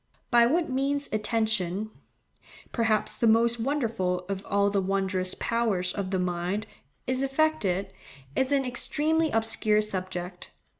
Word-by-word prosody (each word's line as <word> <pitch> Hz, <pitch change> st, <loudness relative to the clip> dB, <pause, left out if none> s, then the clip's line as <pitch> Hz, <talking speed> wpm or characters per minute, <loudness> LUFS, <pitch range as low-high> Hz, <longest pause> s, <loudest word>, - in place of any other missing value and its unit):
By 235 Hz, -1 st, +6 dB
what 320 Hz, +6 st, +1 dB
means 280 Hz, +2 st, 0 dB
attention—perhaps 215 Hz, +1 st, -2 dB
the 230 Hz, -, +2 dB
most 230 Hz, +1 st, +4 dB
wonderful 225 Hz, -9 st, -1 dB
of 195 Hz, -1 st, -4 dB
all 200 Hz, 0 st, +2 dB
the 200 Hz, -1 st, +1 dB
wondrous 190 Hz, -1 st, 0 dB
powers 215 Hz, -6 st, 0 dB
of 200 Hz, -2 st, -3 dB
the 190 Hz, -, 0 dB
mind—is 180 Hz, -, -3 dB
effected, 270 Hz, -, 0 dB, 0.4 s
is 265 Hz, +1 st, +1 dB
an 275 Hz, -2 st, +2 dB
extremely 310 Hz, +6 st, +1 dB
obscure 220 Hz, -2 st, +2 dB
subject. 185 Hz, -3 st, -4 dB
215 Hz, 115 wpm, -27 LUFS, 190-250 Hz, 0.4 s, By